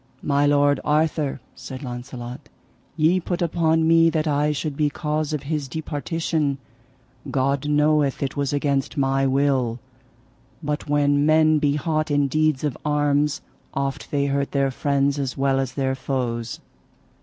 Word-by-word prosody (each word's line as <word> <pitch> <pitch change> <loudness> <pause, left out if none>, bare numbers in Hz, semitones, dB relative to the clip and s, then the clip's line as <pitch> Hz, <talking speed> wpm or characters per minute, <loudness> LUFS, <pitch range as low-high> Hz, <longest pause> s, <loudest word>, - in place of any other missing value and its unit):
My 145 0 +2
lord 145 -1 +3
Arthur, 150 -3 0
said 130 +1 -9
Launcelot, 125 +2 -7 0.5
ye 165 +4 +3
put 175 0 -3
upon 160 -1 +2
me 165 0 +5
that 160 -1 -1
I 150 0 +2
should 150 0 -3
be 150 0 +1
cause 150 0 -2
of 150 -3 -3
his 145 -1 -2
departition; 155 0 -2 0.7
God 140 +2 0
knoweth 150 -2 +2
it 135 - -3
was 140 -2 -1
against 140 0 -1
my 135 0 +2
will. 130 -3 +1 0.8
But 150 0 -3
when 145 -1 +3
men 155 0 +4
be 145 -1 +1
hot 155 +1 -1
in 145 -1 +2
deeds 155 -1 +1
of 145 -4 -1
arms 150 0 +1 0.3
oft 140 0 -3
they 140 -1 0
hurt 140 0 -1
their 135 -1 +1
friends 140 +1 0
as 135 -2 -3
well 135 0 +2
as 130 -2 -2
their 135 -1 0
foes. 120 -3 -3
145 Hz, 150 wpm, -23 LUFS, 135-155 Hz, 0.8 s, me